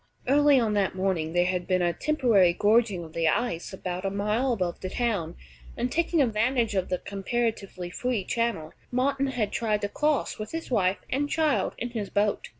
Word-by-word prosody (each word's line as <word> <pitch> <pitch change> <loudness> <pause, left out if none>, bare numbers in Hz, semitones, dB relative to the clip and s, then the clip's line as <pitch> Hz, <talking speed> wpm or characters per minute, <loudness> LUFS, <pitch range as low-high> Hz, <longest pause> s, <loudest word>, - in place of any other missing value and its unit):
Early 285 0 +5
on 225 -3 +1
that 200 -2 +1
morning 185 -4 -1
there 175 0 +3
had 180 -1 -1
been 185 -1 +2
a 175 0 +1
temporary 230 - +3
gorging 210 -2 +2
of 160 -1 -11
the 165 -1 +1
ice 175 -1 0
about 185 -1 -5
a 195 - 0
mile 210 +6 0
above 180 -7 -2
the 185 - -5
town, 200 -8 -1 0.4
and, 245 +1 -1
taking 335 -2 +2
advantage 230 0 +1
of 190 -2 -1
the 180 - 0
comparatively 200 -2 -3
free 245 -1 -1
channel, 230 -8 -2 0.2
Martin 275 +2 +1
had 230 -6 -1
tried 215 -3 0
to 205 - -2
cross 295 -1 0
with 215 +5 -6
his 325 -4 -5
wife 190 -4 +2
and 285 +2 0
child, 295 -12 +1
in 240 +1 -4
his 215 -4 -4
boat. 205 0 0
210 Hz, 190 wpm, -27 LUFS, 185-245 Hz, 0.4 s, Early